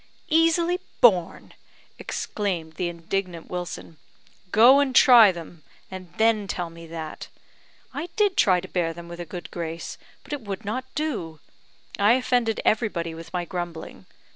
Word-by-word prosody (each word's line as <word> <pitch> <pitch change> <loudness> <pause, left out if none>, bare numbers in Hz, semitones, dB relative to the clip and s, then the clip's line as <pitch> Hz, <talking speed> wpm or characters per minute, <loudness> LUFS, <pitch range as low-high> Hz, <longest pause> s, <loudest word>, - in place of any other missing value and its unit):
"Easily 330 +2 +3 0.2
borne!" 185 -8 +3 0.5
exclaimed 175 -6 -3
the 175 +2 -2
indignant 175 0 -4
Wilson. 175 -2 -6 0.5
"Go 245 +6 +7
and 270 -3 0
try 235 -5 +8
them; 170 -2 -10 0.3
and 185 -2 -9
then 220 -2 +2
tell 175 -3 -4
me 165 0 -12
that. 160 -1 -7 0.7
I 320 +5 -5
did 410 -3 +2
try 185 -2 +4
to 185 - -9
bear 170 -3 -1
them 170 +1 -10
with 170 0 -9
a 175 - -5
good 175 +1 -8
grace, 165 -1 -6 0.2
but - - -8
it 290 - -4
would 205 0 -6
not 255 +6 -3
do. 225 - -3 0.6
I 205 +3 +5
offended 245 -3 +1
everybody 195 -7 0
with 165 0 -10
my 175 -1 -2
grumbling. 175 -2 -7
185 Hz, 150 wpm, -24 LUFS, 170-240 Hz, 0.7 s, try